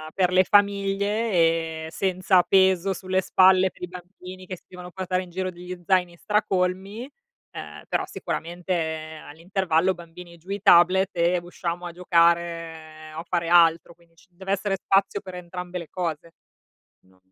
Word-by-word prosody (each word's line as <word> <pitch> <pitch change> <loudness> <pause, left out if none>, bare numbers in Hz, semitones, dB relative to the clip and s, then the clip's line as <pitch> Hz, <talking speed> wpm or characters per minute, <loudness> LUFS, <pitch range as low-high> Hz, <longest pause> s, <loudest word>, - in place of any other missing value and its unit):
per 180 -2 +2
le 185 +1 +5
famiglie 200 +2 +1
e 165 -2 +1
senza 185 0 +2
peso 190 +1 +3
sulle 190 0 -1
spalle 185 0 +4
per - - -16
i 180 - -3
bambini 180 +1 -11
che 185 -1 -6
si - - -25
devono 180 -1 -10
portare 185 0 -2
in 180 - -10
giro 185 +1 -3
degli 180 +1 -9
zaini 180 -3 +1
stracolmi, 195 +3 -1 0.4
ehm, - - -9
però - - -1
sicuramente 160 -2 -4
all'intervallo: 175 +2 0
"Bambini 170 0 -13
giù 175 +4 -20
i 200 +1 -3
tablet 185 +3 +5
e 175 +1 +2
usciamo 175 0 -5
a 175 - -5
giocare 165 -2 0
o 165 +2 -6
fare 170 -1 -2
altro." 170 -1 +4
Quindi 170 0 -28
ci 185 - -24
deve 190 +2 -4
essere 195 0 -1
spazio 195 +1 +1
per 185 -3 -9
entrambe 180 0 -7
le 170 -3 -8
cose. 170 -2 -4 0.7
No. 95 0 -30
180 Hz, 155 wpm, -24 LUFS, 170-190 Hz, 0.7 s, le